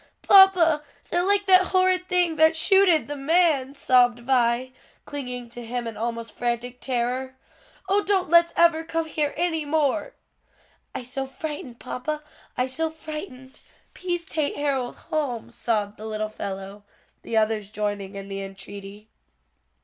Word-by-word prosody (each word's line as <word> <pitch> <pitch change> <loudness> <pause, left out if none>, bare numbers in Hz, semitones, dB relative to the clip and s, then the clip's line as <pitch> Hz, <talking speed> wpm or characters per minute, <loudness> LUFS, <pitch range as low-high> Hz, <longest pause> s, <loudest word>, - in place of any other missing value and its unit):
"Papa, 365 -6 +6 0.3
they's 350 +1 +2
like 405 0 +2
that 370 -1 +6
horrid 370 -1 +2
thing 355 -3 +2
that 315 +1 +5
shooted 380 -2 +4
the 290 - -4
man," 285 -2 +2
sobbed 245 -3 +3
Vi, 245 0 +1 0.3
clinging 250 -4 -6
to 240 +1 -8
him 240 +1 -4
in 225 -1 -5
almost 230 0 -4
frantic 245 +1 -3
terror. 255 +1 -2 0.5
"Oh 405 +1 +2
don't 380 -2 +1
let's 340 +1 +5
ever 335 -1 +4
come 330 0 -2
here 300 -2 -1
any 325 -2 0
more!" 310 - 0 0.8
"I - - -4
so 270 +2 -5
frightened, 285 -4 -7
papa, 300 +4 -4 0.3
I 250 - +2
so 315 +5 -2
frightened; 305 -4 -9 0.3
p'ease 350 -2 -3
tate 305 -3 -2
Harold 275 -4 -1
home," 290 -8 -3
sobbed 210 -3 -2
the 220 - -7
little 215 0 -3
fellow, 200 -1 -7 0.4
the 225 - -2
others 215 -2 +1
joining 205 -2 -4
in 195 0 -7
the 195 0 -5
entreaty. 195 +1 -10
270 Hz, 145 wpm, -24 LUFS, 235-325 Hz, 0.8 s, Papa